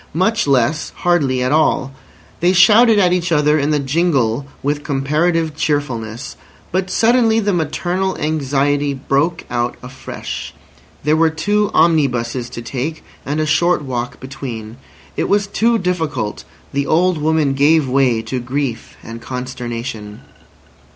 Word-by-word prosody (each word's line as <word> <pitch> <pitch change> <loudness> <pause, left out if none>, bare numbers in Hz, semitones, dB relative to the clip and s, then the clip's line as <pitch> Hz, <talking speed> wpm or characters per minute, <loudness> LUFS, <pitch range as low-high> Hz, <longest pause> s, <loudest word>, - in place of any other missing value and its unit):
Much 210 +2 +1
less—hardly 140 +1 +1
at 125 - 0
all. 150 -3 +2 0.5
They 175 +2 +3
shouted 215 +5 +6
at 180 -3 +4
each 180 -1 -1
other 150 -1 +3
in 145 +1 0
the 150 - +2
jingle 140 -4 0 0.2
with 145 +1 -1
comparative 155 +3 0
cheerfulness. 130 -6 -3 0.4
But 185 +1 -1
suddenly 225 +2 +3
the 205 -2 0
maternal 180 +3 -1
anxiety 145 -1 0
broke 145 +5 0
out 120 0 -1
afresh. 130 +1 -7 0.5
There 150 +2 +3
were 165 0 +3
two 205 +6 0
omnibuses 125 -7 +2
to 120 - -7
take, 135 +6 -4 0.2
and 145 +2 -1
a 155 - +1
short 165 +2 +2
walk 125 -2 -4
between. 125 -4 -7 0.4
It - - -1
was 205 0 +2
too 225 +4 +1
difficult! 160 - -2 0.3
The 140 0 -1
old 175 +1 +2
woman 155 -2 +1
gave 145 +2 +3
way 125 -3 +2
to 125 +3 -3
grief 125 -1 -4
and 115 0 -8
consternation. 120 -4 -6
145 Hz, 135 wpm, -18 LUFS, 130-170 Hz, 0.5 s, shouted